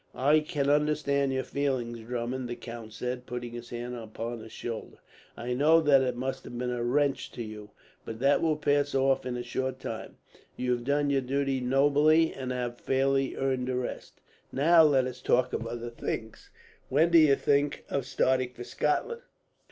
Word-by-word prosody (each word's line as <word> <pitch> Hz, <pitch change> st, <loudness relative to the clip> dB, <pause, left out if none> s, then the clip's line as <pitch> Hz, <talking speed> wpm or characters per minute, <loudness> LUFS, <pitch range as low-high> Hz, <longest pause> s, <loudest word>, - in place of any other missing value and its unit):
"I 145 Hz, +4 st, +4 dB
can 150 Hz, -2 st, -2 dB
understand 145 Hz, -1 st, +2 dB
your 130 Hz, 0 st, -1 dB
feelings, 130 Hz, -5 st, -2 dB
Drummond," 120 Hz, +2 st, -4 dB
the 120 Hz, -, -3 dB
count 115 Hz, -2 st, -9 dB
said, 125 Hz, +3 st, -5 dB
putting 120 Hz, -1 st, -5 dB
his 120 Hz, 0 st, -8 dB
hand 120 Hz, +1 st, -5 dB
upon 115 Hz, +1 st, -6 dB
his 110 Hz, 0 st, -11 dB
shoulder. 115 Hz, -1 st, -6 dB, 0.4 s
"I 125 Hz, +1 st, -3 dB
know 155 Hz, +6 st, +5 dB
that 145 Hz, -4 st, +5 dB
it 130 Hz, -2 st, 0 dB
must 130 Hz, +2 st, -4 dB
have 120 Hz, -, -7 dB
been 125 Hz, 0 st, -2 dB
a 120 Hz, -1 st, -2 dB
wrench 135 Hz, +2 st, 0 dB
to 120 Hz, -, -5 dB
you, 105 Hz, -1 st, -9 dB, 0.3 s
but 110 Hz, -, -7 dB
that 140 Hz, +4 st, +3 dB
will 160 Hz, -2 st, +2 dB
pass 145 Hz, -1 st, +1 dB
off 135 Hz, -1 st, +2 dB
in 125 Hz, -1 st, -3 dB
a 120 Hz, -, -4 dB
short 130 Hz, +2 st, -3 dB
time. -, -, -7 dB, 0.4 s
You 125 Hz, 0 st, -1 dB
have 120 Hz, -1 st, -1 dB
done 145 Hz, +1 st, +1 dB
your 135 Hz, -1 st, +2 dB
duty 135 Hz, +1 st, -1 dB
nobly, 145 Hz, +5 st, +4 dB
and 130 Hz, -1 st, -5 dB
have 120 Hz, -1 st, -3 dB
fairly 135 Hz, 0 st, +1 dB
earned 130 Hz, -1 st, -1 dB
a 130 Hz, -, -1 dB
rest. 125 Hz, -1 st, -5 dB, 0.3 s
"Now, 165 Hz, +5 st, +5 dB
let 140 Hz, -5 st, +4 dB
us 125 Hz, -1 st, -6 dB
talk 125 Hz, 0 st, +2 dB
of 115 Hz, -, -2 dB
other 120 Hz, 0 st, -5 dB
things. 110 Hz, -1 st, -5 dB, 0.4 s
When 160 Hz, +6 st, +3 dB
do 170 Hz, -, +8 dB
you 150 Hz, -3 st, +6 dB
think 145 Hz, +1 st, +1 dB
of 135 Hz, -2 st, -2 dB
starting 130 Hz, -2 st, +1 dB
for 120 Hz, -, -8 dB
Scotland?" 455 Hz, -, -1 dB
130 Hz, 190 wpm, -28 LUFS, 120-140 Hz, 0.4 s, do